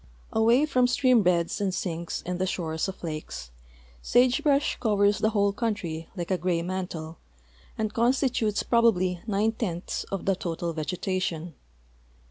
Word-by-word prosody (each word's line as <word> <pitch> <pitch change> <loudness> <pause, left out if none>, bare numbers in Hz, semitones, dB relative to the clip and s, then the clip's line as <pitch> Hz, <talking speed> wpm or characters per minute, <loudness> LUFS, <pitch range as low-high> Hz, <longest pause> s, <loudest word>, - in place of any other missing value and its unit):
Awa}^ 235 +7 +4
from 255 -4 +3
stream 255 -2 +4
beds 175 -1 +1
and 195 -2 +1
sinks 170 -3 -3
and 180 0 -3
the 185 - 0
shores 160 -3 -2
of 190 -1 -8
lakes, 155 - -6 0.5
sage 250 - +3
brush 290 -2 +2
covers 205 -3 +2
the 215 - +2
whole 200 -2 +2
country 200 -8 -3
like 175 0 -4
a 185 - +1
gray 170 -1 0
mantle 175 -3 -5 0.6
and 215 -1 -2
constitutes 240 -3 +1
probably 185 -7 +2
nine 215 +1 +2
tenths 190 -6 -3
of 195 - -5
the 195 - +2
total 170 -1 -3
vegetation. 170 0 -2
190 Hz, 145 wpm, -27 LUFS, 170-225 Hz, 0.6 s, Awa}^